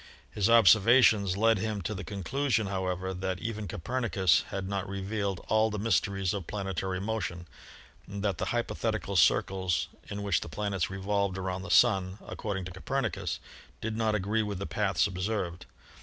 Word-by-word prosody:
His 105 0 +1
observations 110 -2 +6
led 115 0 +4
him 105 -2 -2
to 110 - -2
the 100 0 -5
conclusion, 110 - -1
however, 95 -1 -2
that 95 0 -3
even 110 -2 -4
Copernicus 95 -1 +1
had 95 -1 -4
not 100 -1 -3
revealed 100 -1 -3
all 110 +1 +3
the 105 - -4
mysteries 95 -3 +1
of 100 -5 -5
planetary 95 -2 -3
motion 95 -4 -3 0.6
and 100 0 -6
that 100 -4 0
the - - 0
hypothetical 110 -3 -2
circles 95 +2 +2 0.2
in 100 0 -4
which 100 - +1
the - - -6
planets 100 -3 -2
revolved 100 0 -1
around 95 0 -3
the 100 - -7
Sun, 95 -5 +4
according 95 -3 -4
to 95 - -7
Copernicus, 115 +6 -2 0.4
did 110 0 -3
not 110 -1 +1
agree 105 +3 0
with 105 -2 -3
the 100 - -4
paths 95 -5 +1
observed. 90 -2 -3
100 Hz, 160 wpm, -29 LUFS, 95-110 Hz, 0.6 s, observations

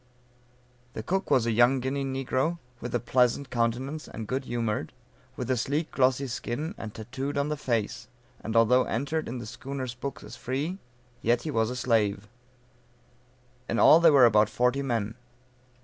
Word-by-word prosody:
The 110 - -5
cook 190 - -1
was 125 -3 +3
a 115 - +1
young 120 +4 +4
Guinea 135 +2 -2
negro, 135 +4 -1 0.2
with 120 0 -4
a - - +2
pleasant 125 +3 +1
countenance, 125 +6 -1
and 110 - -7
good 130 +4 -3
humored, 115 -3 -2 0.4
with 125 +1 -3
a - - +3
sleek 145 +7 -1
glossy 130 +1 +2
skin, 125 - -4
and 110 - -7
tatooed 130 +7 -5
on 140 +1 0
the 150 - -1
face; 115 -7 -2 0.4
and 110 +1 -4
although 120 +3 +5
entered 145 +6 -2
in 125 - -4
the 120 - -6
schooner's 130 +2 -5
books 135 +3 -6
as 105 +3 -9
free, 140 +11 -3 0.4
yet 120 +3 +1
was 115 -7 0
a 125 - -4
slave. 105 -5 +1 1.4
In 115 - 0
all 160 - +8
there 165 -1 +6
were 135 -4 +7
about 105 -2 +4
forty 125 +3 +1
men. 115 -5 -1
125 Hz, 165 wpm, -27 LUFS, 115-140 Hz, 1.4 s, all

